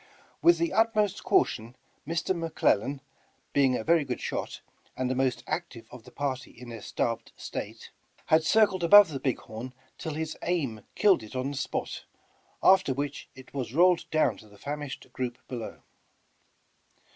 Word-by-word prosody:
With 345 Hz, 0 st, +6 dB
the 335 Hz, -2 st, 0 dB
ut 225 Hz, 0 st, +3 dB
most 205 Hz, -2 st, +1 dB
caution, 125 Hz, -, +1 dB, 0.3 s
Mr. 170 Hz, +3 st, 0 dB
McLellan, 145 Hz, -5 st, 0 dB, 0.5 s
being 135 Hz, -3 st, +4 dB
a -, -, -4 dB
very 165 Hz, +2 st, +4 dB
good 130 Hz, -3 st, -4 dB
shot, -, -, -4 dB, 0.4 s
and 130 Hz, -, 0 dB
the 130 Hz, -, 0 dB
most 130 Hz, -2 st, 0 dB
active 145 Hz, -6 st, -4 dB
of 125 Hz, -2 st, -12 dB
the 125 Hz, -, -13 dB
party 130 Hz, -2 st, -3 dB
in 125 Hz, 0 st, -12 dB
their 115 Hz, -2 st, -7 dB
starved 115 Hz, +2 st, -2 dB
state, -, -, -7 dB, 0.3 s
had 160 Hz, 0 st, +4 dB
circled 190 Hz, 0 st, +3 dB
above 205 Hz, +1 st, +9 dB
the 140 Hz, -3 st, -4 dB
big 130 Hz, -3 st, 0 dB
horn 115 Hz, +4 st, -8 dB, 0.3 s
till 160 Hz, -2 st, -4 dB
his 155 Hz, 0 st, -3 dB
aim 140 Hz, -11 st, -1 dB
killed 200 Hz, -, +4 dB
it 110 Hz, +3 st, -11 dB
on 130 Hz, +2 st, -1 dB
the -, -, -6 dB
spot, -, -, -3 dB, 0.6 s
after 190 Hz, -8 st, +5 dB
which 145 Hz, +1 st, -4 dB
it 130 Hz, 0 st, -14 dB
was 130 Hz, -2 st, -4 dB
rolled 175 Hz, +1 st, +4 dB
down 145 Hz, -9 st, +2 dB
to 110 Hz, -, -15 dB
the 100 Hz, -, -17 dB
famished 145 Hz, +4 st, -5 dB
group 125 Hz, -1 st, -3 dB
below. 120 Hz, -3 st, -7 dB
140 Hz, 170 wpm, -28 LUFS, 125-170 Hz, 0.6 s, above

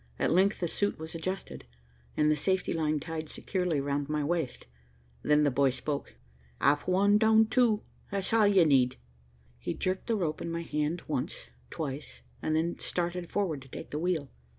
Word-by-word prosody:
At -, -, +1 dB
length 190 Hz, +4 st, +3 dB
the 175 Hz, -, +1 dB
suit 205 Hz, +5 st, -1 dB
was 160 Hz, 0 st, -7 dB
adjusted, 185 Hz, +4 st, -4 dB, 0.5 s
and 150 Hz, 0 st, +4 dB
the -, -, +3 dB
safety 190 Hz, +5 st, 0 dB
line 155 Hz, -2 st, 0 dB
tied 160 Hz, 0 st, -5 dB
securely 180 Hz, -6 st, -1 dB
round 140 Hz, +1 st, -1 dB
my 150 Hz, -1 st, 0 dB
waist. 160 Hz, -4 st, -2 dB, 0.6 s
Then 150 Hz, 0 st, +4 dB
the 145 Hz, -, +3 dB
boy 135 Hz, +1 st, +3 dB
spoke. 140 Hz, +3 st, -4 dB, 0.4 s
"Up 145 Hz, +1 st, +2 dB
one, 200 Hz, +3 st, +4 dB
down 220 Hz, 0 st, +6 dB
two. 225 Hz, -2 st, +2 dB, 0.3 s
That's 200 Hz, +1 st, -2 dB
all 220 Hz, -2 st, +5 dB
ye 195 Hz, -4 st, +5 dB
need." 130 Hz, -4 st, +3 dB, 0.6 s
He -, -, -3 dB
jerked 185 Hz, 0 st, -2 dB
the 230 Hz, -, +2 dB
rope 165 Hz, -7 st, -1 dB
in -, -, -3 dB
my 170 Hz, 0 st, -3 dB
hand 150 Hz, +2 st, -2 dB
once, 140 Hz, -5 st, -3 dB, 0.2 s
twice, 145 Hz, -2 st, -5 dB, 0.2 s
and 155 Hz, -, 0 dB
then 165 Hz, +2 st, 0 dB
started 175 Hz, 0 st, -2 dB
forward 170 Hz, -9 st, -1 dB
to 135 Hz, -, -13 dB
take -, -, -9 dB
the 150 Hz, -, -2 dB
wheel. 165 Hz, -5 st, -1 dB
165 Hz, 180 wpm, -30 LUFS, 150-190 Hz, 0.6 s, down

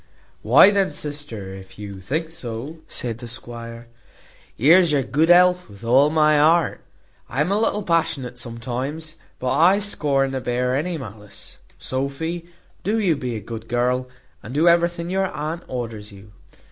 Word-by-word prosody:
"Why 200 Hz, -, +7 dB
then, 200 Hz, -2 st, +2 dB
sister, 145 Hz, -10 st, -7 dB
if 95 Hz, -1 st, -12 dB
you 100 Hz, -2 st, -8 dB
think 155 Hz, -, -3 dB
so," 135 Hz, 0 st, -7 dB
said 115 Hz, -2 st, -3 dB
the 120 Hz, -, -8 dB
squire, 115 Hz, -1 st, -8 dB, 0.7 s
"here's 165 Hz, +6 st, +6 dB
your 140 Hz, -2 st, +2 dB
good 150 Hz, +6 st, +1 dB
health 180 Hz, -3 st, +5 dB
with 100 Hz, +2 st, -14 dB
all 130 Hz, +5 st, +5 dB
my 155 Hz, -1 st, +4 dB
heart. 160 Hz, 0 st, +3 dB, 0.5 s
I 130 Hz, -, -4 dB
am 150 Hz, +6 st, +1 dB
a 205 Hz, -, +2 dB
little 210 Hz, -2 st, 0 dB
passionate 140 Hz, -8 st, -1 dB
sometimes, 130 Hz, +7 st, -5 dB, 0.2 s
but 125 Hz, 0 st, -2 dB
I 180 Hz, +5 st, +5 dB
scorn 145 Hz, -9 st, 0 dB
to 130 Hz, -1 st, -3 dB
bear 125 Hz, +1 st, 0 dB
any 165 Hz, +4 st, -1 dB
malice. 105 Hz, -6 st, -10 dB, 0.2 s
Sophy, 160 Hz, +6 st, -4 dB, 0.3 s
do 210 Hz, +5 st, 0 dB
you 190 Hz, -7 st, +2 dB
be 125 Hz, -4 st, -4 dB
a -, -, -3 dB
good 115 Hz, +2 st, -8 dB
girl, 125 Hz, +2 st, 0 dB, 0.3 s
and 125 Hz, +5 st, -8 dB
do 160 Hz, +4 st, +3 dB
everything 170 Hz, 0 st, +2 dB
your 190 Hz, 0 st, +1 dB
aunt 160 Hz, +1 st, -4 dB
orders 115 Hz, -4 st, -6 dB
you." 100 Hz, +1 st, -14 dB
140 Hz, 160 wpm, -22 LUFS, 120-165 Hz, 0.7 s, Why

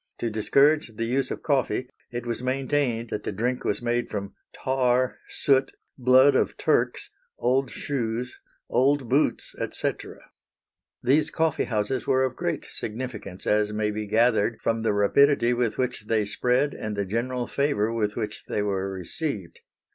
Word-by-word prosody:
To 115 Hz, -, -2 dB
discourage 140 Hz, +4 st, +3 dB
the 115 Hz, -, -2 dB
use 130 Hz, +3 st, 0 dB
of -, -, -5 dB
coffee 135 Hz, -3 st, 0 dB, 0.2 s
it 120 Hz, 0 st, -5 dB
was 120 Hz, 0 st, -2 dB
maintained 130 Hz, -2 st, -1 dB
that -, -, -2 dB
the -, -, -3 dB
drink 120 Hz, +5 st, -1 dB
was 105 Hz, +3 st, -1 dB
made 120 Hz, 0 st, 0 dB
from 100 Hz, -1 st, -5 dB, 0.2 s
tar, 130 Hz, -1 st, +1 dB
soot, 135 Hz, -1 st, +2 dB, 0.2 s
blood 130 Hz, +2 st, +5 dB
of -, -, +1 dB
Turks, -, -, 0 dB, 0.3 s
old 130 Hz, +1 st, +1 dB
shoes, 125 Hz, -3 st, -3 dB, 0.3 s
old 135 Hz, 0 st, +2 dB
boots, 140 Hz, +6 st, +1 dB
etc. -, -, -4 dB, 0.8 s
These 145 Hz, +5 st, +3 dB
coffee 160 Hz, -1 st, 0 dB
houses 115 Hz, +3 st, -1 dB
were 130 Hz, 0 st, +3 dB
of 130 Hz, -, -1 dB
great -, -, -2 dB
significance, 110 Hz, -5 st, -6 dB
as 105 Hz, 0 st, +2 dB
may 105 Hz, 0 st, 0 dB
be 105 Hz, 0 st, -4 dB
gathered 115 Hz, 0 st, +2 dB
from 115 Hz, 0 st, 0 dB
the 110 Hz, -, +1 dB
rapidity 120 Hz, +5 st, +4 dB
with 120 Hz, -2 st, 0 dB
which 125 Hz, -4 st, -2 dB
they 110 Hz, -2 st, +2 dB
spread 125 Hz, +7 st, +1 dB
and 110 Hz, -1 st, -4 dB
the 100 Hz, -1 st, -1 dB
general 120 Hz, +5 st, -2 dB
favor 130 Hz, -7 st, 0 dB
with 105 Hz, -2 st, -1 dB
which 110 Hz, -3 st, -4 dB
they 105 Hz, -, -1 dB
were 95 Hz, -1 st, -1 dB
received. 95 Hz, -, -4 dB
120 Hz, 155 wpm, -26 LUFS, 105-130 Hz, 0.8 s, blood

